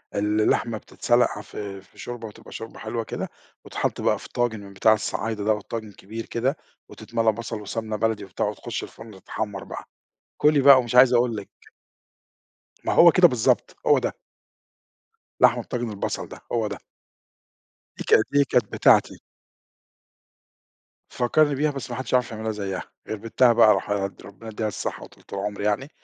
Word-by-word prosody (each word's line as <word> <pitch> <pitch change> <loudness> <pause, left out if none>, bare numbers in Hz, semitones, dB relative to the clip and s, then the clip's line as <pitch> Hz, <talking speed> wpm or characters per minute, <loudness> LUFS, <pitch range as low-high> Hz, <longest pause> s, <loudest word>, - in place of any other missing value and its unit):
ال 105 +1 +1
اللحمة 110 +1 +1
بتتْسلق 120 -1 +1
في 100 -2 -7
في 90 - -25
شوربة 120 -2 -6
وتبقى 110 +2 -14
شوربة 115 - -8
حلوة 115 +1 -3
كده - - -5 0.4
وتتحط - - -2
بقى - - +1
في - - -12
طاجِن 120 -3 -1
من 100 -1 -11
بتاع 110 +3 +4
الصعايدة، 110 0 -3
دوَّة 110 0 +1
طاجِن 110 0 -6
كبير 110 +4 -8
كده 130 +6 -1 0.3
وتتْمَلى 115 -1 0
بصل 115 0 -6
وسمنة 110 +1 -4
بلدي 105 -1 -1
وبتاع 95 - -3
وتخُش - - -4
الفرن 115 0 -11
تتحمَّر 100 +1 -5
بقى، - - -8 0.5
كُلي 150 -1 +4
بقى 140 0 +9
ومش 120 0 -3
عايز 125 0 +7
أقول 120 -1 +2
لِك. 100 - -7 1.4
ما - - 0
هو 170 0 +8
كده 180 0 +7
بالضبط، 120 -5 +1
هو - - +6
ده. - - -2 1.3
لحمة - - +5
طاجِن 120 -2 -4
البصل 100 -2 -4
ده، - - -11
هو 115 -2 +1
ده. - - -5 1.2
دي - - -5
كانت 110 - +4
إيه، 140 0 +5
كانت 120 -5 +1
بتاعتي. - - +4 2.0
فكَّرني 145 +4 +2
بيها 150 +2 +1
بس 135 -2 -6
ما 120 - -4
حدش 130 - -6
يعرف 125 -2 +2
يعملها 110 0 -3
زيَّها، 100 -3 -4 0.3
غير 110 - -2
بنْتها 115 +3 +3
بقى 110 -2 +6
راحد 100 -1 -3
ربّنا 105 +3 -12
يديها 110 0 -2
الصحة 105 - -5
وطوْلِة - - -14
العمر 100 +1 -4
يعني، 105 +7 -1
110 Hz, 165 wpm, -24 LUFS, 105-120 Hz, 2.0 s, بقى